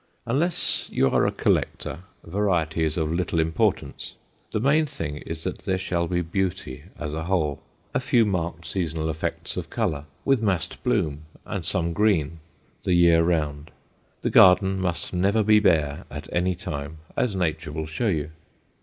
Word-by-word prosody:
Unless 155 +9 0
you 65 - +2
are - - +3
a - - +1
collector, - - 0 0.2
variety 85 -4 0
is 80 0 0
of 80 -2 0
little 85 -1 0
importance. 80 0 0 0.4
The - - 0
main 150 +6 +3
thing 75 - -5
is 80 +1 -6
that - - -3
there 95 - -1
shall 90 -2 -1
be 90 +1 0
beauty 85 -5 -3
as 75 -3 -4
a 80 +1 -3
whole, 80 -6 0 0.3
a - - +2
few 125 -3 +3
marked 85 -4 -2
seasonal 80 -4 -1
effects 80 - -4
of - - -4
color 70 -1 -1 0.2
with 135 -4 +3
massed 95 -6 -1
bloom 75 0 0 0.2
and - - -4
some 85 0 0
green 85 -6 +1 0.4
the 90 - +1
year 85 -1 +6
round; 80 -3 0 0.5
the - - 0
garden 95 +1 +6
must 90 -1 -2
never 100 +5 +2
be 105 +1 +6
bare 75 -8 +2
at 75 +2 -7
any 90 +1 +1
time, 75 -1 -5 0.2
as 110 -6 0
nature 80 -3 -1
will 80 +1 -3
show 80 +9 -2
you. 75 -6 -1
85 Hz, 165 wpm, -25 LUFS, 80-95 Hz, 0.5 s, year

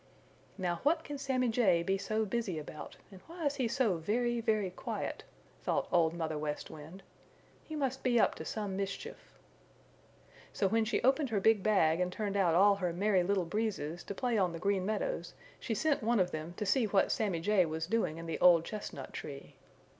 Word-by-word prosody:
"Now 175 -3 -1
what 320 +3 +2
can 290 -2 -6
Sammy 260 -3 0
Jay 195 -8 +3
be 195 +3 +1
so 215 +3 -1
busy 210 -5 -2
about, 155 0 -8
and 190 -1 -13
why 335 -1 -6
is 285 0 0
he 255 -4 +1
so 230 -7 +1
very, 235 +7 0
very 215 -4 0
quiet?" - - -5 0.4
thought - - 0
Old 165 -1 +3
Mother 160 -2 -2
West 150 -1 -4
Wind. 160 +5 -11 0.6
"He 315 - -7
must 265 -3 -1
be 245 -2 +3
up - - +4
to - - -4
some 205 -3 -4
mischief." 195 0 -5 1.2
So 195 - +1
when 225 +2 +2
she 220 - -1
opened 270 +2 +3
her 215 -3 +1
big 220 +1 +4
bag 180 -6 +3
and 180 0 0
turned 200 +1 -3
out 180 -5 +3
all 200 +2 +5
her 180 -3 -1
Merry 190 +2 +2
Little 190 0 +1
Breezes 175 -4 -2
to 200 - -5
play 240 0 0
on 180 -3 +1
the - - -4
Green 195 0 0
Meadows - - -2 0.2
she 225 - -3
sent 305 +4 +1
one 230 0 +2
of 180 -1 +2
them 160 +3 -6
to 210 - -2
see 230 +4 +3
what 195 -2 +2
Sammy 195 -6 0
Jay 195 +2 +3
was 160 0 -3
doing 185 -5 0
in 165 - -7
the 165 - -4
old 170 -2 +6
chestnut 215 -1 -7
tree. - - -8
200 Hz, 200 wpm, -32 LUFS, 175-230 Hz, 1.2 s, old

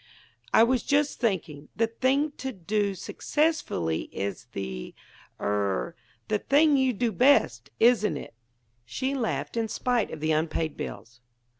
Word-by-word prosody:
"I 225 - +6
was 245 +1 +2
just 285 +3 +1
thinking: 160 - -2
the 225 - +3
thing 260 +6 +1
to 265 - -4
do 200 0 -1
successfully 295 - -1
is 100 -1 -4
the 65 -1 -5 0.4
er 100 - -1 0.3
the 210 -1 +1
thing 295 +4 +4
you 265 -1 +3
do 235 +1 -1
best, 170 - +3
isn't 220 -8 +4
it?" - - -9 0.5
She 260 - -3
laughed, 245 -4 -2
in 230 -1 0
spite 245 +1 0
of 160 - -7
the 155 +1 0
unpaid 155 0 0
bills. 115 +4 -8
215 Hz, 140 wpm, -27 LUFS, -, 0.5 s, I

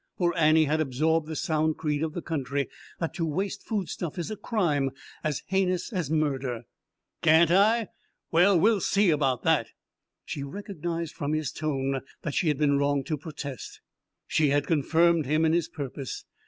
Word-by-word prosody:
For 175 -2 +1
Annie 160 -1 +5
had 155 +2 +1
absorbed 155 +3 +1
the 160 - -5
sound 155 0 0
creed 150 -1 -1
of 160 -1 -2
the 175 - -5
country, 140 -3 -2 0.3
that 165 - -2
to 170 - -3
waste 195 +6 -2
foodstuff 185 -6 -4
is 175 +4 -3
a - - -3
crime 165 - 0 0.3
as 150 -3 -2
heinous 185 +1 0
as 175 -7 -2
murder. 135 -6 -1 0.6
"Can't 160 +1 +5
I? 215 +3 +4 0.4
Well, 180 +2 +5
we'll 210 +2 +3
see 200 -1 +3
about 135 -5 +1
that!" - - +3 0.6
She 140 - -5
recognized 170 0 -5
from 145 +1 -3
his 155 -4 -1
tone 135 -3 -2 0.2
that 150 - -3
she 180 - +1
had 150 -3 +2
been 140 -1 +2
wrong 140 -1 +1
to 155 - -2
protest; 145 -3 -7 0.5
she 155 -2 +2
had 145 0 +2
confirmed 165 0 +3
him 155 +3 +2
in 160 - +3
his 170 -2 +1
purpose. 135 -4 -6
155 Hz, 170 wpm, -27 LUFS, 145-175 Hz, 0.6 s, Annie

